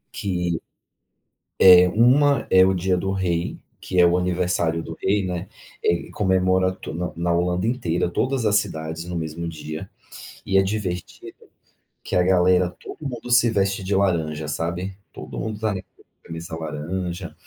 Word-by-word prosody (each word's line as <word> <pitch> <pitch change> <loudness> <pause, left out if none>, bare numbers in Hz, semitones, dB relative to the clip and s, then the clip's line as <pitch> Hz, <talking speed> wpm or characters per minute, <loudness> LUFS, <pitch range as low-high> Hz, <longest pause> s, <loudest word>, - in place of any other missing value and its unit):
Que, 90 -4 -2 1.1
é, 90 -1 +9
uma 130 +8 +4
é 95 0 +6
o 95 - +3
Dia 95 0 0
do 95 +2 -2
Rei, 90 -3 -1 0.2
que 90 - -3
é 90 - +7
o 85 +1 +3
aniversário 90 -2 0
do 80 - -7
rei, 100 0 +1
né, 90 +1 -4 0.3
eh, 85 0 0
comemora 95 -1 +2
to 95 -4 -8
na 90 +2 -3
na 85 +1 0
Holanda 90 +3 0
inteira, 115 -9 0
todas 125 +6 -1
as 105 - +2
cidades 80 -5 -3
no 90 0 -5
mesmo 80 +1 -4
dia, 80 -1 -7 0.6
e 95 - +1
é 95 - +6
divertido, 95 -3 -4 0.7
que - - -8
a - - +5
galera 90 0 +3
todo - - -10
mundo 125 -1 -6
se 120 -1 +5
veste 100 -2 0
de 100 - 0
laranja, 80 -6 0
sabe, 85 +5 -3 0.2
todo - - -8
mundo 110 -1 -4
tá 110 -1 -1
de 95 - -4 0.4
camisa 80 0 -7
laranja, 85 +3 -5
90 Hz, 160 wpm, -23 LUFS, 85-95 Hz, 1.1 s, é